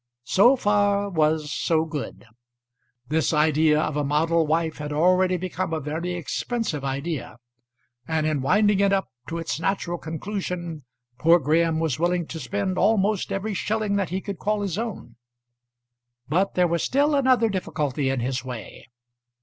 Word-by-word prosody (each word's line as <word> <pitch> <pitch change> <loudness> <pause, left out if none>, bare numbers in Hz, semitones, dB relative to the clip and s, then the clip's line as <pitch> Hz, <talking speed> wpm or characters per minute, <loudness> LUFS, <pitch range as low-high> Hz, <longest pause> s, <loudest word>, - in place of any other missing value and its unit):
So 240 +8 +5
far 205 -3 +1
was 155 -2 +1
so 160 +1 +1
good. 150 -6 -6 0.8
This 160 +2 +1
idea 155 0 +3
of 155 -1 -1
a 150 - 0
model 160 +3 +1
wife 160 0 0
had 150 0 -5
already 180 +4 +3
become 185 -1 -3
a 160 - 0
very 160 +5 -3
expensive 175 - -3
idea, 140 +1 -4 0.7
and 160 -1 0
in 155 -3 0
winding 205 +8 +3
it 200 0 +3
up 195 -1 0 0.2
to 165 - -4
its 165 -2 -3
natural 175 -1 -1
conclusion 170 -2 -5 0.3
poor 165 +2 +6
Graham 160 +1 +1
was 160 -4 -1
willing 175 0 +1
to 160 - -6
spend 190 +5 -2
almost 210 -2 +2
every 205 +2 -2
shilling 210 +1 -1
that 195 -4 -1
he 185 +3 -2
could 200 -2 -6
call 210 0 0
his 195 -5 -2
own. 215 - -6 1.1
But 180 +7 +1
there 180 -1 +4
was 170 -1 0
still 285 +3 +2
another 255 -4 +3
difficulty 150 -8 -2
in 135 -2 -1
his 130 +1 -2
way. 125 -4 -8
170 Hz, 160 wpm, -24 LUFS, 155-200 Hz, 1.1 s, poor